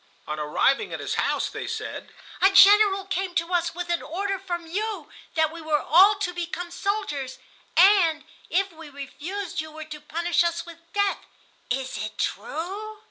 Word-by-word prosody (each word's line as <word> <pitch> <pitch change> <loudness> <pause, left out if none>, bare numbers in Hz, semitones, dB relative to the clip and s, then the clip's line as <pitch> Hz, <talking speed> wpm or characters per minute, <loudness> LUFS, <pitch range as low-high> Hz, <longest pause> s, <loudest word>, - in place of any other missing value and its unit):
On 150 0 -4
arriving 265 - +1
at - - -4
his - - -3
house - - 0
they - - -6
said: - - -5 0.3
"A 385 - +7
General 400 0 +7
came 380 -1 -2
to 335 +2 0
us 340 -1 0
with 350 0 -5
an 340 - +1
order 390 +4 -3
from 345 -3 -4
you 420 +6 -4 0.2
that 315 -1 +2
we 335 0 -9
were 310 -1 +1
all 385 +8 +6
to 395 -3 -3
become 345 0 -5
soldiers, 345 -10 -3 0.4
and 350 -4 +5 0.2
if 390 +1 +1
we 325 -2 -11
refused 320 +6 -5
you 315 - -8
were 310 0 -8
to 305 -1 -9
punish 340 +3 +1
us 340 0 -1
with 335 -1 -11
death. 405 -1 +1 0.5
Is 260 -4 -2
it 215 - -6
true?" 385 - -4
345 Hz, 175 wpm, -25 LUFS, 315-390 Hz, 0.5 s, A